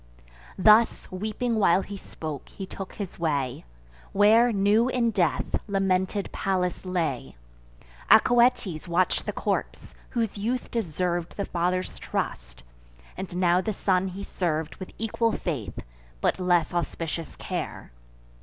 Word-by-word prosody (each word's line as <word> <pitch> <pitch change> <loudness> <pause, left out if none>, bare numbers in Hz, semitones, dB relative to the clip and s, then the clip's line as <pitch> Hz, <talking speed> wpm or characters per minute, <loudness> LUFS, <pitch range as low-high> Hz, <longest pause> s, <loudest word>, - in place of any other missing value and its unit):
Thus, 215 +4 +5
weeping 215 +5 -2
while 190 -1 +4
he 200 - -7
spoke, 155 -6 -7
he 195 - -7
took 190 0 -8
his 195 -4 -6
way, 140 - -1 0.5
Where, 220 +4 +6
new 210 +4 +3
in 240 -3 +1
death, 180 -7 +1 0.2
lamented 195 0 0
Pallas 185 -1 -1
lay. 165 - -2 0.7
Acoetes 235 -8 +4
watch'd 175 +1 +1
the - - +1
corpse; - - -3 0.2
whose 225 -4 -2
youth 245 +5 -2
deserv'd 175 -4 -2
The 200 - -1
father's 180 +1 -1
trust; - - -4 0.5
and 180 -2 -6
now 180 0 +3
the 215 +3 -2
son 190 -1 +1
he 190 +2 -6
serv'd 160 -5 -2
With 185 - -7
equal 225 +1 0
faith, 125 - -3 0.4
but - - +1
less 175 -3 +2
auspicious 165 -1 -3
care. - - -5
185 Hz, 125 wpm, -26 LUFS, 170-210 Hz, 0.7 s, Where